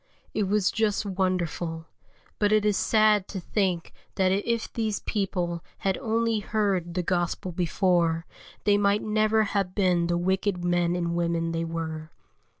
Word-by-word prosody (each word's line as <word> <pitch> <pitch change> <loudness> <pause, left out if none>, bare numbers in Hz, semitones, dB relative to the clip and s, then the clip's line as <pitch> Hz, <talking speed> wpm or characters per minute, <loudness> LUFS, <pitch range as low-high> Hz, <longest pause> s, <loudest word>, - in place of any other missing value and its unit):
It 210 -3 0
was 200 -1 +2
just 215 -2 0
wonderful; 180 -4 -2 0.5
but 205 -1 +2
it 215 -1 +3
is 210 -1 +3
sad 215 -2 +3
to 195 - -5
think 180 -2 -1 0.2
that 190 -1 +3
if 225 +4 -1
these 220 -3 -1
people 180 -5 -2
had 195 -1 0
only 230 0 0
heard 195 -5 -1
the 180 - 0
Gospel 175 +1 -1
before, 170 -2 +1 0.4
they 205 -1 +4
might 205 +1 +2
never 215 0 +2
have 200 -3 -1
been 180 -4 +2
the 175 0 +1
wicked 185 0 0
men 175 0 +2
and 170 -1 -1
women 170 -1 0
they 165 0 -1
were. 160 -1 -5
185 Hz, 150 wpm, -26 LUFS, 170-210 Hz, 0.5 s, they